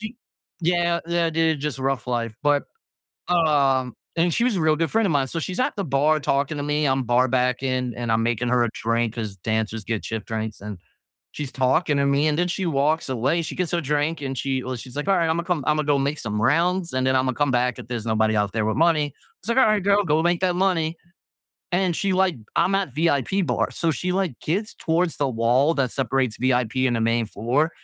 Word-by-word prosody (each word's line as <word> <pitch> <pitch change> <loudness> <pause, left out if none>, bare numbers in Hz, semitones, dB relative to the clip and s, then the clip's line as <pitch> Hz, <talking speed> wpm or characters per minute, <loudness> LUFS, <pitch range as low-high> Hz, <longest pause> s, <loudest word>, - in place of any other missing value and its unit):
she 220 +2 -7 0.4
yeah, 170 0 +1
yeah, 170 -1 +1
dude, 160 -2 +1
just 150 -2 -3
rough 135 -2 -1
life. 115 -3 -2
But, 145 -1 +2 0.7
um, 140 -7 +2 0.2
and 170 0 +2
she 235 - +1
was 245 -3 +1
a 170 - 0
real 155 0 +3
good 165 +1 -1
friend 225 0 +2
a - - -1
mine. 140 -3 +1
So, 165 - -4
she's 180 +6 -4
at 255 - 0
the 200 -3 -3
bar 150 +3 +2
talking 140 +1 0
to 145 - -3
me. 150 +1 0
I'm 135 0 +1
bar 125 +2 +2
backing, 125 0 0
and 120 -2 -3
I'm 110 0 +2
making 120 +1 0
her 125 -1 +3
a - - -2
drink, 115 0 -1
'cause 110 -4 -4
dancers 110 +2 -2
get 115 -2 -3
shift 110 -2 -5
drinks, 110 -1 -4
and 105 -2 -7 0.5
she's 145 -3 -6
talking 140 +3 +1
to 140 - +2
me, 140 +2 +2
and 150 0 +1
then 175 - +2
she 190 +1 -2
walks 155 -1 +1
away. 130 +7 0
She - - -6
gets 180 -3 -2
her 175 - 0
drink, 150 +2 -1
and 135 -1 -4
she 135 -2 -2
well, 130 0 -4
she's 125 +1 -10
like, 145 +4 -4
"Alright, 175 -4 +3
Imma 165 +1 0
come 170 -4 -1
Imma 150 0 +2
go 145 -1 +2
make 140 +3 -1
some 105 -2 -3
rounds, 170 +5 +1
and 130 0 0
then 130 0 +2
Imma 130 0 +1
come 145 +1 0
back 125 0 +1
if - - -9
there's 120 -3 -4
nobody 110 -1 +1
out 105 -1 0
there 110 -1 0
with 110 - -1
money." 155 -4 +2 0.3
So, 235 - -1
then 260 +2 +5
I 215 -1 +3
go, 200 +1 +3
"Go 155 0 +2
make 175 0 +2
that 180 -2 +1
money." 175 -4 +1 0.8
And 180 -1 +1
she 195 -1 0
like 185 -2 +2 0.2
I'm 180 +4 +3
at 195 -8 -1
VIP 160 +4 +1
bars. 125 - -1
So, 165 - +1
she, 180 +6 -3
like, 185 -8 -1
gets 200 +7 -2
towards 165 +1 0
the 145 - +1
wall 125 +6 +2
that 130 -4 0
separates 135 -4 0
VIP 130 0 +1
and 120 - 0
the - - -1
main 115 0 +1
floor. 125 +10 0
145 Hz, 235 wpm, -23 LUFS, 125-170 Hz, 0.8 s, then